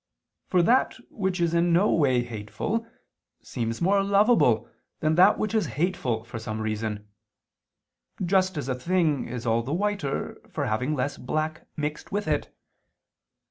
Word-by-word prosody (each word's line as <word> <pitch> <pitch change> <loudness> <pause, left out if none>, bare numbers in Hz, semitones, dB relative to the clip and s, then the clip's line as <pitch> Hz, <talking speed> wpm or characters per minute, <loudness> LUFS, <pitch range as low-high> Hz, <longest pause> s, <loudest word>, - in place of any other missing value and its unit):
For 180 -2 +3
that 250 +8 +3 0.2
which 190 -3 -2
is 170 -1 +1
in 170 +1 +3
no 190 +5 +4
way 130 -6 +3
hateful 120 - -4 0.6
seems 115 +2 -3
more 195 +2 +4
lovable 200 - +3 0.3
than 155 0 +1
that 180 +3 +6
which 215 - -2
is 215 -7 +1
hateful 140 -10 0
for 115 0 -7
some 110 0 -5
reason: 110 -1 -3 1.2
just 185 -1 +2
as 145 - -3
a 130 - 0
thing 155 +1 0
is 120 0 -6
all 115 0 +2
the 130 +5 -4
whiter 200 -7 -2
for - - -2
having 125 +8 0
less 140 +1 -2
black 155 +4 -3
mixed 150 0 -4
with 205 -1 -2
it. 150 -2 -1
155 Hz, 150 wpm, -26 LUFS, 120-185 Hz, 1.2 s, that